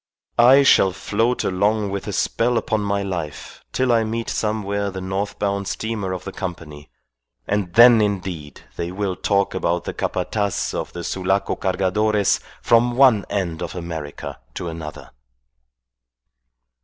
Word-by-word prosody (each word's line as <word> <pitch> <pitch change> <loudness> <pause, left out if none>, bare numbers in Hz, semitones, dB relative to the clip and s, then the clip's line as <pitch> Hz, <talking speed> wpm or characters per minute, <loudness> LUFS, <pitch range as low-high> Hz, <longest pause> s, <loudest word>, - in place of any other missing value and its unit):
I 130 +4 +7
shall 95 -8 +5
float 115 +6 0
along 100 +2 +1
with 100 0 -4
a - - -2
spell 120 +1 +1
upon 110 -1 0
my 100 0 -1
life 85 -6 -6
till 130 -1 +1
I 115 -1 +3
meet 115 +1 -3
somewhere 100 -2 -1
the 95 -1 -6
north 95 +2 -3
bound 100 -1 -1
steamer 110 -4 -3
of 90 -1 -4
the 95 - -6
Company, 85 - -7 0.6
and 100 -3 -1
then 120 -1 +8
indeed 90 -8 -3 0.2
they 85 +1 -3
will 95 -1 -2
talk 100 +2 +1
about 85 -2 0
the - - -5
Capataz 100 -3 -2
of - - -4
the 85 - -6
Sulaco 95 +3 0
Cargadores 100 +2 +1 0.2
from 120 +1 +3
one 125 -7 +5
end 85 -5 -2
of - - -5
America 80 -4 -6 0.2
to 85 - -4
another." 80 -3 -8
100 Hz, 145 wpm, -21 LUFS, 90-110 Hz, 0.6 s, then